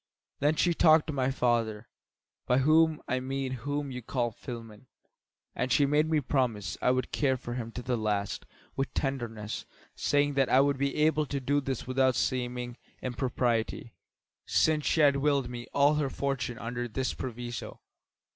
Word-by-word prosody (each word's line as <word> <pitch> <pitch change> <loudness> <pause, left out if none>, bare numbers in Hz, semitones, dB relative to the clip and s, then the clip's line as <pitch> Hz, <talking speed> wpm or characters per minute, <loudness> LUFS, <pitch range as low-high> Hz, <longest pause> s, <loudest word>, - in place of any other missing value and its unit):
Then 150 +2 +2
she 175 +2 +2
talked 160 -1 +5
of 150 - -2
my 130 -1 +1
father, 115 -4 0 0.6
by 125 - +3
whom 155 +3 +4
I 130 - 0
mean 135 0 -3
him 130 - -3
whom 145 +2 -3
you 125 0 -5
call 120 0 -1
Philemon; 115 0 -9 0.7
and 130 - -2
she 145 - +5
made 150 +2 +2
me 160 -1 +3
promise 115 -9 -1
I - - +3
would 130 0 0
care 135 -3 +1
for 120 -1 -6
him 115 -2 -4
to 125 - -6
the 125 0 0
last 105 -2 -2 0.3
with 135 0 -1
tenderness, 115 -6 -3 0.3
saying 145 0 +1
that 135 -1 +2
I 130 - +5
would 140 0 +2
be 140 0 0
able 155 0 +2
to 140 - -2
do 145 +2 +1
this 135 -2 -3
without 130 0 +2
seeming 125 -1 -2 0.3
impropriety, 120 -3 -1 0.5
since 155 -2 +2
she 160 - +3
had 140 -2 +5
willed 140 -3 +1
me 120 -1 -7
all 140 +1 +4
her 150 -2 0
fortune 130 -4 -2
under 120 +1 -4
this 130 +3 -2
proviso. 120 -2 -6
130 Hz, 175 wpm, -29 LUFS, 120-145 Hz, 0.7 s, talked